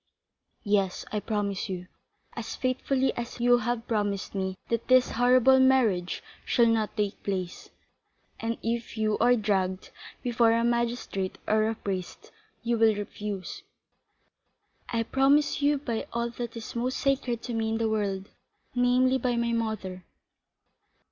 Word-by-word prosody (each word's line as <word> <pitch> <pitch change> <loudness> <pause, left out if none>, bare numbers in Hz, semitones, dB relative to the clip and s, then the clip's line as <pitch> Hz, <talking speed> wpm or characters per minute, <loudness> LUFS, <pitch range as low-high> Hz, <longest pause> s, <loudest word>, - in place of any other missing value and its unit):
"Yes, 200 -3 0
I 210 - 0
promise 205 -2 -2
you, 180 -1 -4 0.5
as - - -5
faithfully 260 +1 0
as 240 +1 -5
you 245 0 +5
have 240 0 -2
promised 205 -3 -1
me 190 -1 -2
that 230 0 -1
this 255 0 +5
horrible 250 +2 +5
marriage 235 -9 +3 0.2
shall 235 - +3
not 225 -1 +1
take 205 -2 -1
place, 185 -3 -4 0.7
and 225 0 -1
that - - -14
if 230 0 -2
you 215 -1 +1
are 245 +1 +5
dragged 190 -4 -1 0.3
before 235 -2 +3
a 230 0 +2
magistrate 235 -5 -1
or 215 0 +3
a 225 - -2
priest, 190 -4 -5 0.3
you 235 -1 0
will 220 -1 +5
refuse." 205 -2 -5 1.3
"I 230 -1 0
promise 275 +5 +3
you 290 +1 +3
by 240 -5 -3
all 235 0 -1
that 235 -1 -6
is 225 - -8
most 250 +2 -1
sacred 260 -4 0
to 245 - -4
me 225 -1 0
in 225 - 0
the 225 0 +1
world, 200 -2 -1 0.4
namely, 250 +1 +3
by 245 -1 0
my 235 0 0
mother." 215 -5 -3
230 Hz, 150 wpm, -28 LUFS, 205-245 Hz, 1.3 s, you